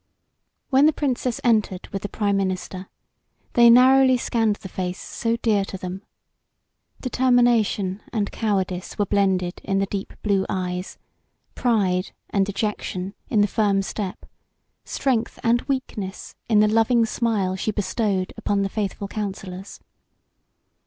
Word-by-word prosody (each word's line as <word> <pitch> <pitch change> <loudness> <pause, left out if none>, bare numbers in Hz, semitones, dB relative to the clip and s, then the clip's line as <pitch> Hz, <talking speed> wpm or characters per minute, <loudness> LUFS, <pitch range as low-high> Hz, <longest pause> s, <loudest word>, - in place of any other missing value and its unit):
When 275 +3 +6
the 310 - +3
Princess 255 -4 -1
entered 215 -6 +1
with 195 - -4
the 205 - -5
prime 205 -2 0
minister 185 -1 -3 0.6
they 235 -1 +7
narrowly 260 +2 +6
scanned 225 -3 +1
the 195 - -10
face 180 -1 -4
so 230 0 -2
dear 215 -4 +2
to 195 - -6
them. 185 +1 -6 1.0
Determination 240 -6 +2
and 210 -4 -1
cowardice 190 -4 -2
were 205 - +2
blended 190 -3 0
in 195 -1 0
the 195 - +2
deep 195 0 -5
blue 200 -2 +2
eyes, 180 0 -3 0.6
pride 195 -7 +1 0.2
and 195 -1 +2
dejection 200 -2 -3 0.2
in 210 - +3
the 205 - +4
firm 200 -2 +1
step, 195 -1 -5 0.6
strength 245 -5 -1
and 235 +1 +3
weakness 210 -8 -4 0.2
in 210 -2 +5
the 215 - +5
loving 225 +2 +3
smile 215 -5 0
she 190 - -2
bestowed 205 -2 -1
upon 200 -1 0
the 195 - -1
faithful 200 -1 -3
counsellors. 195 -2 -6
205 Hz, 135 wpm, -23 LUFS, 190-230 Hz, 1.0 s, they